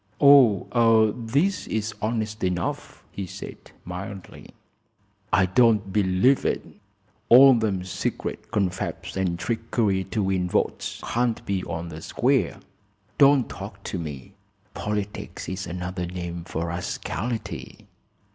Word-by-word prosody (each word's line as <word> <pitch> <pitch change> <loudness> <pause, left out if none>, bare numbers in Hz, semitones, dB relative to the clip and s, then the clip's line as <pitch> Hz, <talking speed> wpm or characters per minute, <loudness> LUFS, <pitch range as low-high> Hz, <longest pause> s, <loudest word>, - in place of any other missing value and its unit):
"Oh, 115 -4 +5
this 140 +12 0
is 110 0 -2
honest 110 -1 -2
enough," 90 -1 -3
he 100 -2 -5
said, - - -8 0.3
mildly. 90 +1 -8 0.8
"I 95 - +4
don't 105 -1 +3
believe 100 +6 +3
it. - - -1 0.6
All 135 +3 +9
them 105 -6 0
secret 95 - -4
confabs 100 -5 -2
an' 95 -3 0
trickery 110 -1 -1
to 100 +3 -2
win 95 -2 0
votes - - -1
can't 120 -1 0
be 95 -2 -1
on 80 +1 -5
the 80 0 -8
square. - - 0 0.6
Don't 140 -3 +6
talk 100 0 -9
to 95 - -4
me! 75 -6 -7 0.4
Politics 105 -1 -4
is 95 0 -4
another 90 0 -4
name 85 -1 -6
for 85 0 -3
rascality!" 110 +6 -4
100 Hz, 120 wpm, -25 LUFS, 90-115 Hz, 0.8 s, All